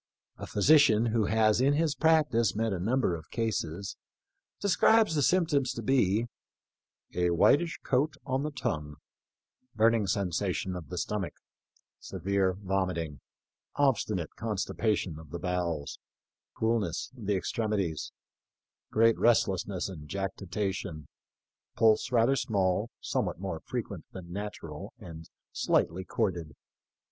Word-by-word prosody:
A - - -7
physician, 115 -1 +5
who 115 -2 +1
has 110 +2 +3
in 140 +2 +4
his 155 0 +1
practice 150 - +3
met 110 -1 0
a 95 - -3
number 115 +1 +1
of 80 -1 -10
cases, 100 -5 -3 0.6
describes 210 0 +4
the 150 - +1
symptoms 145 -4 +2
to 115 - -6
be 115 -4 +2 0.4
" - - -54
a 90 -1 +1
whitish 145 - +3
coat 140 +3 +1
on 130 0 0
the 150 - -2
tongue, 75 - -3 0.8
burning 110 -1 +3
sensation 95 -1 -1
of 90 -4 -8
the 90 - -5
stomach, 95 0 -2 0.6
severe 95 0 -1
vomiting, 90 -6 -2 0.6
obstinate 110 - +1
constipa 110 0 -1
tion 80 -5 -5
of 80 -2 -13
the 85 - -5
bowels, 85 -5 -2 0.6
coolness 110 -1 0
of 110 -6 -9
the 105 - +2
extremities, 100 -5 -2 0.8
great 115 +1 +3
restlessness 100 -5 +2
and 75 -6 -9
jactitation, 95 -4 -3 0.7
pulse 110 +2 +3
rather 120 +2 +4
small, 100 -2 0
somewhat - - -2
more 95 -4 -4
frequent - - -5
than 85 -2 -9
natural, 95 -7 -6
and 80 -2 -10 0.2
slightly 90 +3 +1
chorded. 90 -6 -2
100 Hz, 125 wpm, -29 LUFS, 90-115 Hz, 0.8 s, physician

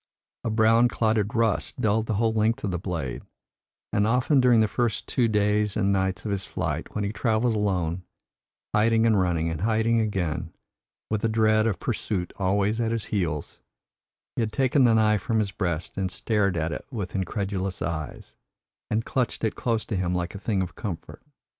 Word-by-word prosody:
A - - -1
brown 110 +2 +4
clotted 110 -3 0
rust 115 -2 0
dulled 110 +1 +1
the 110 - 0
whole 110 +2 +2
length 110 +1 +1
of 100 - -1
the 90 - -2
blade, 80 -9 -4 0.7
and 105 +1 +2
often 125 +5 +3
during 125 -2 +5
the 110 - +4
first 120 +1 -1
two 120 -2 +2
days 105 -1 +1
and 100 -1 +2
nights 95 0 -1
of 105 - -2
his 95 -1 -1
flight, - - -4
when 105 - -1
he 100 +1 -2
travelled 110 +2 +1
alone, 90 -5 0 0.7
hiding 115 +1 +3
and 110 -3 +4
running 85 -2 0
and 80 0 -4
hiding 110 +2 +2
again, 95 -8 -2 0.6
with 110 -1 0
the 115 - +1
dread 110 0 +3
of 105 - -1
pursuit 105 -5 -2
always 100 +4 +1
at 115 -1 0
his 115 -2 -1
heels, 85 -7 -2 0.8
he - - 0
had 110 -1 -1
taken 130 +2 +3
the 115 -2 +5
knife 105 -2 +3
from 115 - 0
his 105 -3 0
breast, 85 -4 -3
and 95 -1 0
stared 100 -2 0
at 80 0 -1
it - - -6
with 105 -9 -5
incredulous 95 0 -2
eyes, 80 -2 -5 0.6
and 110 +2 0
clutched 125 -3 -1
it 110 - +1
close 115 -3 -1
to 105 - -3
him 90 -1 0
like 85 -1 -2
a 100 - -7
thing 100 -2 0
of 90 -1 -6
comfort. 90 -5 -6
105 Hz, 190 wpm, -26 LUFS, 95-115 Hz, 0.8 s, during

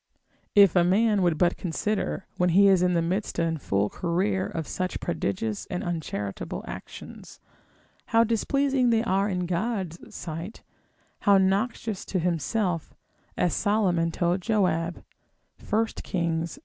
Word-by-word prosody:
If 200 -4 +7
a 175 - +5
man 205 +3 +3
would 175 -3 +2
but 175 +2 +2
consider, 195 +3 -2
when 180 0 +2
he 200 0 +7
is 190 -2 +5
in 180 -1 +2
the 170 - +2
midst 185 +5 -2
and 165 -2 0
full 100 -2 +1
career 185 - -1
of 160 -2 -5
such 185 0 -3
prodigious 110 - -2
and 180 +1 -3
uncharitable 155 - -4
actions, - - -10 0.7
how 230 0 +4
displeasing 260 +3 +1
they 225 -1 +3
are 195 -2 +1
in 180 -2 -1
God's 180 -1 -2 0.2
sight, 165 +5 -6 0.6
how 200 -2 +5
noxious 200 +2 0
to 190 - -2
himself, 175 +1 -1 0.4
as 175 - +1
Solomon 190 -5 +1
told 175 +2 0
Joab, 180 -5 0 0.7
1 220 +2 +3 0.2
Kings, 170 +1 -2
ii. - - -14
180 Hz, 140 wpm, -26 LUFS, 170-205 Hz, 0.7 s, If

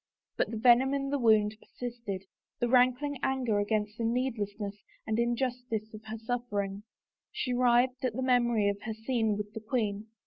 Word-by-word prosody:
But - - 0
the 225 - -4
venom 250 +4 +5
in 275 0 -2
the 285 - +1
woimd 215 -2 +3
persisted 235 -7 -6 0.2
— - - -62
the 240 - +1
rankling 255 +3 +3
anger 250 -6 +1
against 210 +1 -1
the - - -1
needlessness 220 -4 -1 0.3
and 220 +1 0
injustice 240 -2 -1
of 215 0 -10
her 220 +1 -5
suffering. 215 -4 -3 0.5
She 250 - -2
writhed 250 +1 +3
at 250 -3 0
the 260 - -1
memory 240 -4 +3
of 200 0 -1
her 220 0 -4
scene 220 -2 0
with 210 0 -5
the 220 - -5
queen. 215 -2 -2
230 Hz, 175 wpm, -30 LUFS, 215-250 Hz, 0.5 s, venom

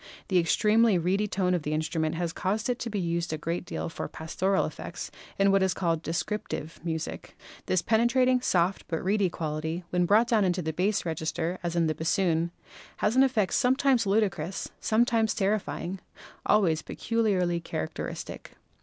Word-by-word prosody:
The 185 -2 +4
extremely 215 +4 +4
reedy 190 +5 +1
tone 185 -2 0
of 175 - +1
this 150 +1 -2
instrument 160 0 -1
has 170 -1 -2
caused 210 +6 -1
it 245 - -3
to 235 - -3
be 205 -2 -2
used 170 -1 -1
a 155 - -2
great 165 +4 -3
deal - - -4
for 165 - -5
pastoral 190 +4 0
effects - - -7 0.3
in 195 0 +4
what 195 0 +4
is 190 -1 +2
called 165 -3 0
"descrip 170 +6 -2
tive" 155 +2 -5
music. 160 -2 -5 0.3
This 185 -2 +1
penetrating, 250 +3 +3
soft, 180 -4 +1
but 165 -2 -3
reedy 195 0 +2
quality, 160 +1 -3
when 180 -1 +2
brought 220 +5 +5
down 220 -4 +4
into 180 -1 0
the 160 0 -2
bass 190 +5 0
register 165 +2 -2
as 175 -1 -3
in 170 -1 +3
the 155 - +1
bas 160 +2 -2
soon, 170 -3 +2 0.5
has 210 +3 +1
an 260 - +6
effect 230 -8 +2
sometimes 260 -3 +3
ludicrous, 195 -2 0
sometimes 225 -1 +2
terrify 210 -1 0
ing, 185 +2 -4 0.5
always 170 -7 +3
peculiarly 195 -7 0
characteristic. 80 - -5
185 Hz, 175 wpm, -28 LUFS, 165-215 Hz, 0.5 s, an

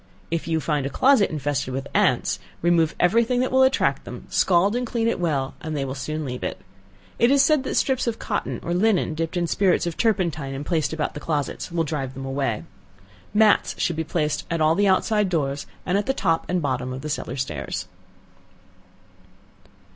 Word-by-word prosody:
If 165 0 -2
you 160 -1 +1
find 150 -2 -1
a - - -4
closet 255 - +4
infested 145 -4 -2
with 135 +1 -3
ants, 125 - +2 0.2
remove 170 -2 +3
every 220 +7 +4
thing 245 +2 0
that 255 - 0
will 260 0 +4
attract 260 0 +2
them, - - -9
scald 190 +4 +3
and 250 - 0
clean 230 -1 0
it 230 - 0
well, 145 -6 -1
and 155 -1 -4
they 135 - -1
will 130 - -4
soon 155 +3 -4
leave 125 -1 -5
it. - - -3 0.6
It 235 - +5
is 280 0 +5
said 305 -4 +3
that - - -2
strips 260 -2 +1
of 230 -1 -1
cotton - - -3
or 170 - -2
linen 190 -3 +2
dipped 165 +3 -3
in 175 - +1
spirits 185 +1 +2
of 170 -2 -4
turpentine, 170 -11 0
and 140 +2 -5
placed 160 -2 0
about 160 -1 -2
the - - -6
closets, 150 +2 -3
will 165 -1 +1
drive 140 -4 -4
them 135 +1 -6
away. 135 -5 -2 0.7
Mats 210 0 +4
should 170 - 0
be 160 - -1
placed 155 -1 -1
at 165 - -1
all 155 0 +4
the 200 +4 +2
outside 205 +1 +2
doors, 145 -5 -1 0.2
and 190 +2 +2
at 205 - -4
the 270 - +1
top 165 -4 +1
and 180 -2 0
bottom 130 -2 -2
of 130 - -6
the 150 - -5
cellar 140 -4 -3
stairs. 130 -7 -4
165 Hz, 205 wpm, -24 LUFS, 145-200 Hz, 0.7 s, It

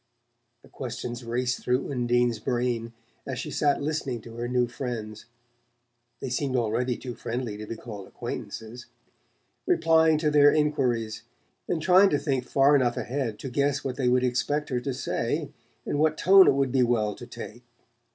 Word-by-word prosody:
The - - -17
questions 120 0 -6
raced 125 +2 -1
through 125 +3 0
Undine's 120 -2 +1
brain 120 -2 -1 0.4
as 130 -2 -3
she - - -5
sat 145 -1 +1
listening 145 -5 -2
to 115 +1 -11
her 120 0 -3
new 125 0 +1
friends 115 -3 -6 1.0
they 135 - -4
seemed 130 +1 -1
already 120 +1 0
too 125 -2 -6
friendly 120 -2 -4
to 105 0 -8
be 115 - -5
called 105 -4 -9
acquaintances! 115 +2 -7 0.8
replying 160 - +4
to 150 -1 +1
their 145 -1 +6
enquiries, 130 -8 0 0.5
and 170 - 0
trying 185 +4 +5
to 145 - +2
think 135 -4 -1
far 140 +3 +4
enough 125 -3 +2
ahead 125 -4 -3
to 135 - -6
guess 140 +1 0
what 130 -2 -3
they 130 -3 0
would 125 +1 +3
expect 145 +4 0
her 125 -3 0
to 130 +2 -3
say, 145 +6 -2 0.3
and 145 - -1
what 155 0 +2
tone 190 +2 +7
it - - +5
would 135 -2 +1
be 130 0 +2
well 115 -4 +1
to 120 - -11
take. 120 -1 -9
125 Hz, 170 wpm, -26 LUFS, 120-145 Hz, 1.0 s, tone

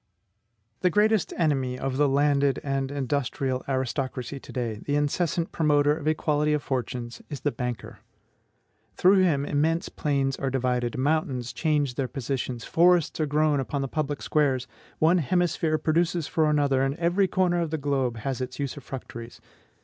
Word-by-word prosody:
The 180 - +3
greatest 210 +2 +2
enemy 135 -6 +1
of 130 0 -3
the 145 0 +3
landed 140 0 +2
and 135 -1 -1
industrial 135 -1 -2
aristocracy 130 0 -2
to - - -12
day, 115 -4 -3
the 145 - -1
incessant 165 +3 0
promoter 150 -2 +3
of 155 -1 -6
equality 150 -1 +1
of 150 - -1
fortunes, 120 -2 -4
is 145 -3 -6
the 145 - 0
BANKER. 125 -3 -5 1.0
Through 190 - +5
him 150 -6 +2
immense 160 +4 0
plains 140 -3 -1
are 135 - -1
divided, 125 -2 -1
mountains 130 -3 0
change 150 -5 0
their 130 +1 -2
positions, 130 -2 -4
forests 175 -1 +3
are 155 - +1
grown 150 0 +2
upon 135 +1 -2
the - - -2
public 145 0 -3
squares, 135 -4 +1 0.3
one 170 +3 +4
hemisphere 165 0 +1
produces 165 +1 +1
for 155 0 +1
another, 140 -3 +2
and 135 +1 0
every 175 +4 +2
corner 180 -2 +1
of 165 - -1
the 160 - -2
globe 135 -5 -1
has 130 +3 -3
its 125 0 -5
usufructuaries. 130 -4 -6
145 Hz, 155 wpm, -26 LUFS, 130-155 Hz, 1.0 s, Through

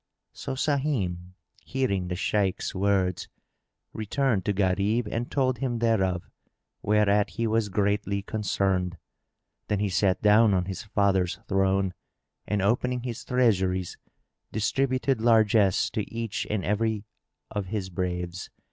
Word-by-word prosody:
So - - -5
Sahim, 125 - -1 0.3
hearing 110 -9 -1
the 90 - -3
Shaykh's 95 +1 0
words, 95 -2 0 0.6
returned 110 -2 0
to 105 - +2
Gharib 100 +4 +1
and 115 +3 -3
told 130 -3 0
him 125 -3 -1
thereof, 95 -6 +1 0.5
whereat 105 -1 +3
he 115 - -2
was 110 -1 +1
greatly 100 0 0
concerned. 95 -4 -1 0.7
Then 105 - 0
he 100 0 0
sat 95 +1 +2
down 105 0 +5
on 90 -1 +1
his 95 -1 -5
father's 100 -4 +1
throne 95 -1 +1 0.5
and, 105 -2 0
opening 125 +3 +1
his 120 -3 -5
treasuries, 95 -8 +1 0.5
distributed 130 +3 0
largesse 110 -4 +4
to 105 - -3
each 115 -2 -3
and 105 -4 -1
every 110 0 0 0.5
of 100 -2 -3
his 95 -2 -4
braves. 90 0 -3
105 Hz, 125 wpm, -27 LUFS, 95-115 Hz, 0.7 s, down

